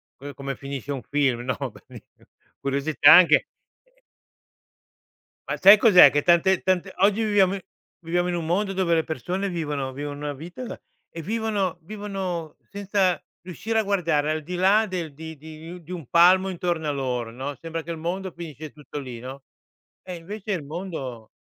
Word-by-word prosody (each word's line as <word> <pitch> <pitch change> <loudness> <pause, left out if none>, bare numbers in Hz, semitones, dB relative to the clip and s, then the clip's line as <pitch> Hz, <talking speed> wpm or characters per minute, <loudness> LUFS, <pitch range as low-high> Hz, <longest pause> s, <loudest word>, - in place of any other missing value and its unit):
co 140 +1 -9
come 135 +1 -5
finisce 140 -1 -6
un 135 -3 -3
film, 135 -5 0
no, 125 -1 -2 0.2
belin - - -14 0.6
curiosità 140 +2 +4
anche, 175 -4 +6 0.4
ehm - - -35 1.5
Ma - - -2
sai 200 +3 +9
cos'è? 210 -5 +8
Che 145 - +1
tante 175 +2 +3
tante 185 0 0
oggi 205 +3 +3
viviamo 200 -3 +3
in - - -5 0.4
viviamo 175 +2 0
in 175 - -1
un 170 -2 -3
mondo 195 +3 0
dove 180 -3 +1
le 160 - +2
persone 185 +5 -3
vivono 150 -6 -3
vivono 145 +1 -5
una 145 0 -4
vita 175 - -8 0.3
e 165 - -8
vivono 205 -2 -1
vivono 190 -5 -5
senza 195 -3 0 0.2
riuscire 215 +6 -3
a 220 - +1
guardare 170 -7 +1
al 155 -1 -3
di 180 +3 -5
là 195 +5 +4
del 175 -5 -4
di 160 +1 -9
di 155 +2 -11
un 180 -1 -10
di 170 - -12
un 170 -7 -6
palmo 185 +4 +5
intorno 175 -3 -2
a - - +1
loro 125 -4 -3
no, 135 +4 -5
sembra 165 -1 -5
che 170 - -6
il 165 - -5
mondo 180 +3 -4
finisce 155 -3 -9
tutto 150 -1 -9
lì 125 -4 -8
no, 130 +3 -9 0.6
e 180 -1 -7
invece 205 +5 -7
il 170 -5 -3
mondo 140 - -7
170 Hz, 175 wpm, -24 LUFS, 145-190 Hz, 1.5 s, sai